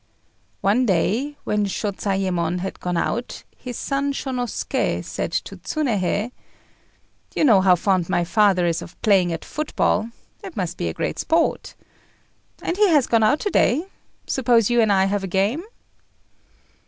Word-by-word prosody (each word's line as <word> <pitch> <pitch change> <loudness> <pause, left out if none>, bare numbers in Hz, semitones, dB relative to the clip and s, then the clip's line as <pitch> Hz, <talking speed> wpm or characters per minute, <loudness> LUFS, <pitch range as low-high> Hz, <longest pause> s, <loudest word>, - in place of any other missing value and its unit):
One 230 +6 +2
day, 225 - 0
when 210 -1 0
Shôzayémon 190 -4 -1
had 190 - -5
gone 180 -1 -2
out, 235 +7 -2
his 250 -2 -7
son 280 0 -1
Shônosuké 255 -3 -2
said - - -4
to - - -3
Tsunéhei 220 - -1 1.0
"You - - +1
know 220 -10 +6
how 185 -1 +5
fond 185 -1 0
my 175 - +1
father 185 0 +3
is 165 -1 0
of 175 - -11
playing 190 -5 +4
at 165 - -5
football: 260 -7 -1 0.3
it - - -9
must - - -3
be - - -2
great - - -3
sport. 325 0 0 0.9
As 345 - -2
he 415 -1 +5
has 295 -6 +4
gone 230 -1 +2
out 220 +8 +3
to 410 - -1
day, 300 +9 +2 0.4
suppose 240 -4 +2
you 240 -1 +4
and 220 -2 +3
I 190 -1 +4
have 200 0 -1
a - - -2
game?" 195 - 0
210 Hz, 155 wpm, -22 LUFS, 190-255 Hz, 1.0 s, know